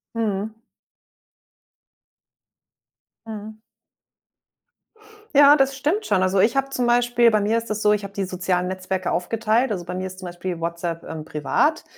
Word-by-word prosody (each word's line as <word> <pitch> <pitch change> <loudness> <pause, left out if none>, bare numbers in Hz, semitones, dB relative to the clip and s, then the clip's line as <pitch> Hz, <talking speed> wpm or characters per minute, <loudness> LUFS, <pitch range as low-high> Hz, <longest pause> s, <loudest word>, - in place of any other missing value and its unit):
Mhm. 215 -1 -2 2.7
Mhm. 215 0 -8 1.8
Ja, 290 +1 +8
das 270 -1 +2
stimmt 305 +10 -1
schon. 190 -3 +2
Also, 185 +1 +2
ich 225 +7 +3
habe 270 0 +1
zum 250 -3 -1
Beispiel 240 0 +4
bei 215 -2 +2
mir 215 +3 +1
ist 230 0 -4
das 215 0 -2
so, 210 - +4
ich 210 -1 0
habe 200 - -9
die 200 - -2
sozialen 180 -1 -1
Netzwerke 185 0 -3
aufgeteilt. 225 +7 0
Also, 185 -4 -3
bei 180 - -6
mir 185 +1 -3
ist 185 0 -10
zum 185 - -7
Beispiel 175 0 -5
WhatsApp, 170 0 -3
ähm, 155 -1 -7
privat. 295 - 0
210 Hz, 155 wpm, -22 LUFS, 185-240 Hz, 2.7 s, Ja